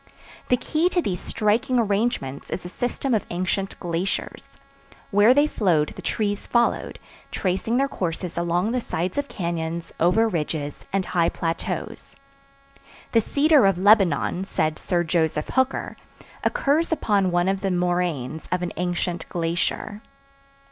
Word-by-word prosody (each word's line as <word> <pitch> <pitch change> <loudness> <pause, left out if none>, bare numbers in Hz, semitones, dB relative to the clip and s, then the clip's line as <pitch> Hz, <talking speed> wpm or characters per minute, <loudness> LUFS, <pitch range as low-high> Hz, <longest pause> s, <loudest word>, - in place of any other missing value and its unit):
The 250 - +4
key 315 +7 +1
to 365 - +1
these 180 -3 -2
striking 230 +5 +1
arrangements 205 - -1
is - - -4
the 180 - -7
system 245 +5 -2
of 215 - +2
ancient 185 +2 -2
glaciers; 175 +2 -3 0.7
where 205 +3 +6
they 290 +3 +5
flowed 175 - +1
the - - -10
trees 205 -2 -2
followed, 235 -1 +1 0.3
tracing 195 +5 -1
their 275 +1 +2
courses 180 -7 -3
along 175 +5 0
the 250 0 0
sides 180 - -2
of 285 - -2
cañons, 170 -4 -3
over 185 +7 +4
ridges, 155 -6 -3
and 195 -1 0
high 170 -2 +2
plateaus. 165 0 -4 1.0
The 230 - +4
cedar 285 -1 +4
of 195 -2 +2
Lebanon, 190 -3 +3
said 155 -5 -1
Sir 175 -2 0
Joseph 160 -2 0
Hooker, 260 0 0 0.5
occurs 310 +5 +1
upon 205 -11 +2
one 175 +1 +1
of 195 0 0
the 195 - 0
moraines 175 -5 -1
of 180 0 0
an 175 - -3
ancient 175 -1 -2
glacier. 175 +5 -2
185 Hz, 140 wpm, -24 LUFS, 170-225 Hz, 1.0 s, where